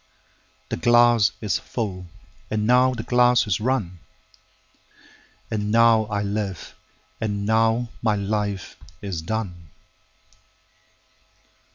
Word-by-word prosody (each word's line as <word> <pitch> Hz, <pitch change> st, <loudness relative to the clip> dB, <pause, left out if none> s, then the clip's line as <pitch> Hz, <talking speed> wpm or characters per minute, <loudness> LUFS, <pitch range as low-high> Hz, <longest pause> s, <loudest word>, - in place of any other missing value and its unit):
17The -, -, -3 dB
glass 120 Hz, -3 st, +5 dB
is 100 Hz, -6 st, -1 dB
full, 95 Hz, -6 st, -5 dB, 0.4 s
and 105 Hz, -1 st, -1 dB
now 125 Hz, +2 st, +4 dB
the 115 Hz, -, -5 dB
glass 125 Hz, 0 st, +3 dB
is 105 Hz, -3 st, 0 dB
run,18And 95 Hz, -1 st, -7 dB
now 115 Hz, +1 st, +4 dB
I 105 Hz, -1 st, -2 dB
live, 100 Hz, -3 st, -4 dB, 0.5 s
and 105 Hz, -2 st, -2 dB
now 115 Hz, +2 st, +2 dB
my 110 Hz, -2 st, +1 dB
life 100 Hz, -1 st, -3 dB, 0.3 s
is 95 Hz, -5 st, -4 dB
done. 90 Hz, -3 st, -5 dB
105 Hz, 95 wpm, -23 LUFS, 95-115 Hz, 0.5 s, glass